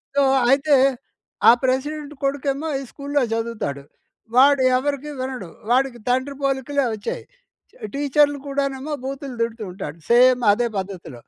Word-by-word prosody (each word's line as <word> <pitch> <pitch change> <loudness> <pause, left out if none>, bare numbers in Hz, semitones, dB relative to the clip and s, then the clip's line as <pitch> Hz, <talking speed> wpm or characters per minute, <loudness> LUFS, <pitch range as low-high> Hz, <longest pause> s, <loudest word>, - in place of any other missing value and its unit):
So, 280 - +4 0.3
అయితే, 280 +2 +4 0.7
ఆ - - +11
president 290 +3 -1
కొడుకేమో 275 +2 -1
ఈ - - -6
స్కూలులో 285 -1 -1
చదువుతాడు. 225 -12 -3 0.5
వాడు 275 +1 +6
ఎవరికీ 285 +2 -3
వినడు. 255 -8 -5 0.2
వాడికి 255 -1 +1
తండ్రి 260 +3 0
పోలికలే 275 +1 0
వచ్చాయి. 205 - -5 0.7
టీచరులు 290 +1 +2
కూడానేమో 275 +1 -2
బూతులు 270 -1 -6
తిడుతూ 230 -1 -3
ఉంటాడు 165 -4 -7
సేమ్ 250 +1 +5
అదే 235 +3 0
పద్ధతిలో. 185 -9 -7
265 Hz, 120 wpm, -22 LUFS, 240-280 Hz, 0.7 s, ఆ